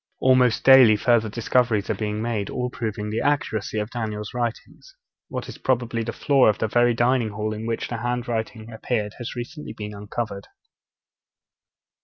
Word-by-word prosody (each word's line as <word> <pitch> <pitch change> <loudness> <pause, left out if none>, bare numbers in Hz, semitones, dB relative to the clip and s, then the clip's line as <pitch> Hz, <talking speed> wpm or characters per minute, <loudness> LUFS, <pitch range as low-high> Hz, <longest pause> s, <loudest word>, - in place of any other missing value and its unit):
Almost 130 -3 +3
daily 130 -5 +8
further 115 0 +2
discoveries 115 -1 +1
are - - +2
being 105 0 -3
made, 110 -4 -2
all 125 -1 -3
proving 105 -3 -4
the 110 - -1
accuracy 110 -8 -1
of 105 +1 -2
Daniel's 110 -1 -4
writings. 120 - -5 0.3
What - - -5
is - - -9
probably 120 -2 0
the 115 +1 -3
floor 135 0 +3
of 105 - +1
the 110 - 0
very 120 +2 +3
dining 120 -1 +2
hall 110 +1 -3
in 110 +1 -5
which 115 -1 -2
the 120 - -4
hand 120 +1 -2
writing 110 -1 -4
appeared 110 -1 -2
has 120 - -6
recently 150 +5 -7
been 105 -1 -7
uncovered. 105 -1 -5
115 Hz, 170 wpm, -24 LUFS, 110-125 Hz, 0.3 s, daily